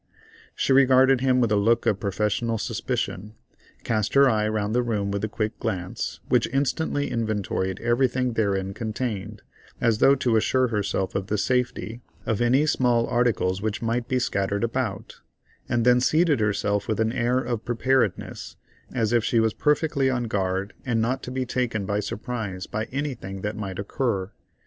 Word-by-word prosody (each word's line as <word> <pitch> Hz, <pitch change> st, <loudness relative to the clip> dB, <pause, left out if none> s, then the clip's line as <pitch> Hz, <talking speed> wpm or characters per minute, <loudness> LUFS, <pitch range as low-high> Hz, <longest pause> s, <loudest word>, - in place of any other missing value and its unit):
She 135 Hz, -, +1 dB
regarded 130 Hz, -1 st, +5 dB
him 130 Hz, -1 st, +3 dB
with 115 Hz, -3 st, +1 dB
a -, -, +4 dB
look 115 Hz, +3 st, +2 dB
of 100 Hz, -, +2 dB
professional 105 Hz, +3 st, -1 dB
suspicion, 105 Hz, 0 st, -3 dB, 0.5 s
cast 110 Hz, 0 st, -1 dB
her 140 Hz, 0 st, +7 dB
eye 110 Hz, -4 st, +2 dB
round 110 Hz, -1 st, -1 dB
the 125 Hz, -, +3 dB
room 105 Hz, -4 st, -1 dB
with 100 Hz, 0 st, -3 dB
a -, -, +1 dB
quick 110 Hz, 0 st, -3 dB
glance, 95 Hz, -6 st, -3 dB
which -, -, +2 dB
instantly 145 Hz, +2 st, -1 dB
inventoried 105 Hz, -4 st, -2 dB
everything 125 Hz, +1 st, +1 dB
therein 100 Hz, -3 st, 0 dB
contained, 110 Hz, -2 st, -4 dB, 0.4 s
as 115 Hz, -3 st, +2 dB
though 140 Hz, -, +6 dB
to 120 Hz, -4 st, +1 dB
assure 130 Hz, +3 st, +2 dB
herself 100 Hz, -3 st, -1 dB
of 95 Hz, -1 st, -2 dB
the 105 Hz, -, 0 dB
safety 125 Hz, 0 st, -1 dB, 0.2 s
of 110 Hz, -1 st, -1 dB
any 130 Hz, +5 st, +3 dB
small 125 Hz, -6 st, +2 dB
articles 110 Hz, -6 st, +1 dB
which 110 Hz, +1 st, -2 dB
might 115 Hz, +1 st, -1 dB
be 130 Hz, -1 st, 0 dB
scattered 100 Hz, -4 st, -1 dB
about, 115 Hz, -4 st, -3 dB, 0.5 s
and 120 Hz, -1 st, +1 dB
then 125 Hz, 0 st, +5 dB
seated 155 Hz, 0 st, +3 dB
herself 105 Hz, -1 st, 0 dB
with 110 Hz, -, -1 dB
an 110 Hz, 0 st, +2 dB
air 120 Hz, +1 st, +1 dB
of 120 Hz, -3 st, -2 dB
preparedness, 120 Hz, -3 st, -1 dB, 0.4 s
as 115 Hz, -3 st, 0 dB
if 120 Hz, -2 st, +3 dB
she 115 Hz, -1 st, +2 dB
was 110 Hz, -1 st, +2 dB
perfectly 150 Hz, -2 st, +1 dB
on 125 Hz, -2 st, 0 dB
guard 95 Hz, -2 st, -2 dB
and 120 Hz, -3 st, 0 dB
not 125 Hz, +4 st, 0 dB
to -, -, -7 dB
be 130 Hz, 0 st, -2 dB
taken 120 Hz, -5 st, -1 dB
by 100 Hz, +1 st, -1 dB
surprise 105 Hz, -2 st, -4 dB
by 110 Hz, +1 st, -3 dB
anything 125 Hz, -9 st, -5 dB
that 105 Hz, +1 st, -3 dB
might 100 Hz, -4 st, -5 dB
occur. 100 Hz, -2 st, -2 dB
115 Hz, 170 wpm, -25 LUFS, 105-125 Hz, 0.5 s, her